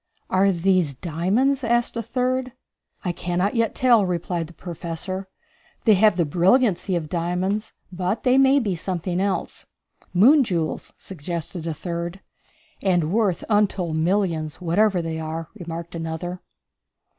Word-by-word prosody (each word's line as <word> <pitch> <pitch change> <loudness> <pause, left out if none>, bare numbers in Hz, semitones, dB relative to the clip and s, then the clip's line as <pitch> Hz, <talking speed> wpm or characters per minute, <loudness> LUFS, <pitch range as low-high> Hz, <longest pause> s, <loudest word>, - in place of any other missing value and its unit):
"Are 195 +1 +4
these 180 -4 +1
diamonds?" 195 - 0
asked 240 +1 +1
a 230 - -1
third. 255 +2 -1 0.5
"I 180 - +1
cannot 175 +3 -1
yet 230 -2 0
tell," 240 -4 +5
replied 175 -2 -2
the 175 - -14
Professor. 175 +2 -5 0.6
"They 220 - +7
have 205 -1 +4
the 170 - +2
brilliancy 185 - +2
of 165 -3 -2
diamonds, 180 +6 -2 0.2
but 185 +4 -2
they 255 +1 +4
may 270 +1 +5
be 215 -8 +1
something 180 +1 -2
else." 200 -1 -2 0.4
"Moon 265 - +6
jewels," 170 -8 -2
suggested 170 0 -6
a 165 - -1
third. 170 +3 -4 0.6
"And 175 -4 +1
worth 205 -4 +1
untold 195 -6 +1
millions, 165 -2 0
whatever 180 +1 +2
they 160 -1 -3
are," 160 +1 -5
remarked 170 -4 -7
another. 165 +2 -4
180 Hz, 135 wpm, -23 LUFS, 170-210 Hz, 0.6 s, They